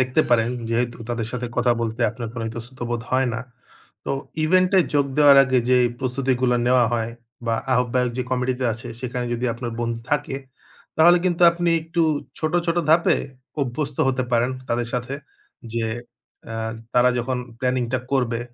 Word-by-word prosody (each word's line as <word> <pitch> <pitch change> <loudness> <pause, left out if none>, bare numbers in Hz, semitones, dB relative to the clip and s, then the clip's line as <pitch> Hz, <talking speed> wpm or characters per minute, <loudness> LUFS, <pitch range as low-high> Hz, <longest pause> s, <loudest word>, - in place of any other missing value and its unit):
দেখতে 130 +4 +2
পারেন 115 -1 +3 0.2
যেহেতু 120 +1 0
তাদের 115 -2 -2
সাথে 125 -1 -3
কথা 125 0 +3
বলতে 115 -1 -3
আপনার 115 0 -6
কোনো 115 -2 -4
ইতস্তত 115 +3 -8
বোধ 120 -1 -2
হয় 130 0 +2
না। 115 - -3 0.6
তো - - -3 0.3
ইভেন্ট 185 +3 +4
এ - - +7
যোগ 140 -1 +3
দেওয়ার 145 -2 +8
আগে 130 -1 +2
যে 125 - +6 0.2
প্রস্তুতিগুলো 130 -1 +1
নেওয়া 125 0 +5
হয় 115 -1 -1 0.3
বা 115 - +2 0.2
আহ্বায়ক 125 0 +1
যে - - +1
কমিটিতে 130 0 0
আছে 120 +1 -9
সেখানে 125 -1 -3
যদি 120 +1 -2
আপনার 120 0 -5
বন্ধু 115 -1 -2
থাকে। 145 -2 0 0.6
তাহলে 170 +2 +7
কিন্তু 175 -1 +1
আপনি 170 0 0
একটু 165 +1 -1 0.4
ছোট, 155 -1 -1
ছোট 170 0 +1
ধাপে 170 +2 +5 0.5
অভ্যস্ত 135 +2 -3
হতে 130 -1 0
পারেন 120 +1 +3 0.2
তাদের 120 0 -1
সাথে। 125 +2 -2 0.6
যে 115 -1 0 0.7
আ - - -4 0.4
তারা 125 0 +5
যখন 125 +1 -1 0.2
প্ল্যানিং 125 0 0
টা 130 - +2
করবে 120 -3 +1
125 Hz, 170 wpm, -23 LUFS, 120-135 Hz, 0.7 s, দেওয়ার